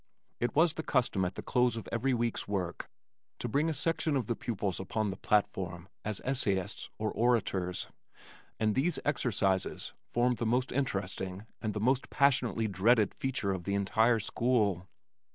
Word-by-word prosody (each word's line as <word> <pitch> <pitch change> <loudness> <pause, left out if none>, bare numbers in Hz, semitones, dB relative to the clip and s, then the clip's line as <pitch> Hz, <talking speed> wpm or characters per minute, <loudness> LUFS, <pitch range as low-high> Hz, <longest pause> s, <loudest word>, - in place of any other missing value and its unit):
It 120 - -1
was 160 +1 +5
the 160 - -4
custom 120 -10 +1
at 90 - -3
the - - -6
close 125 -1 +2
of 115 - -6
every 125 +4 +1
week's 120 -1 -1
work 90 -4 -3 0.5
to - - -3
bring 145 +7 +1
a - - 0
section 155 +1 0
of 130 -4 0
the 115 - -1
pupils 105 -5 -2
upon 105 +2 -1
the - - -5
platform 95 -4 0 0.2
as 105 -2 -2
essayists 105 -7 0
or 110 0 -1
orators, 100 -6 +1 0.7
and 110 -1 +2
these 145 +9 +1
"exercises" 105 -9 0
formed 120 0 +1
the 115 - -2
most 125 +3 +1
interesting 95 -6 -2 0.2
and 110 -2 -2
the - - -1
most 130 +4 +1
passionately 125 -5 +2
dreaded 105 +2 +3
feature 125 -7 -1
of 90 -3 -5
the 100 - 0
entire 110 +4 +3
school. 105 -5 +1
110 Hz, 165 wpm, -31 LUFS, 95-125 Hz, 0.7 s, was